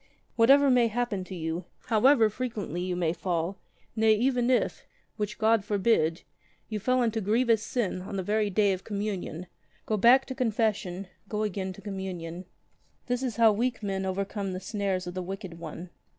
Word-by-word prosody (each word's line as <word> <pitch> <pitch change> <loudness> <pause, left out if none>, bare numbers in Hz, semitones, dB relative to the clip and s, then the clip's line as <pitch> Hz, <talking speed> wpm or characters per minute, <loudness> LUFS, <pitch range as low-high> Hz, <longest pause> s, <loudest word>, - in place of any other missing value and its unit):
"Whatever 270 +4 +6
may 245 -2 +5
happen 225 -4 -2
to 190 - -7
you, 165 +1 -3 0.2
however 235 +1 +5
frequently 215 - -4
you 180 0 -2
may 170 -2 0
fall 175 +1 -2 0.2
— - - -37
nay 220 -1 +4
even 245 +1 +1
if, 255 - 0 0.3
which 210 0 -3
God 220 -1 +3
forbid, 200 -5 +1 0.5
you 215 -1 -2
fell 255 +4 +2
into 225 -1 0
grievous 225 +2 +2
sin 220 -5 -2
on 200 +2 -6
the 190 - -2
very 210 +2 +1
day 200 0 +3
of 185 - -6
Communion, 200 -5 -4 0.4
go 215 - 0
back 240 +6 +7
to 265 - -5
42 - - -15
confession, 210 -6 -1 0.2
go 210 0 -1
again 190 -2 -2
to - - -13
Communion. 185 -3 -5 0.6
This 245 0 -1
is 250 -5 -2
how 230 -2 +6
weak 235 +2 -1
men 195 -1 -2
overcome 195 +1 -2
the 185 - -4
snares 195 -1 -2
of 175 - -5
the 185 - -3
wicked 185 -2 -7
one. 170 +2 -8
205 Hz, 180 wpm, -28 LUFS, 185-230 Hz, 0.6 s, back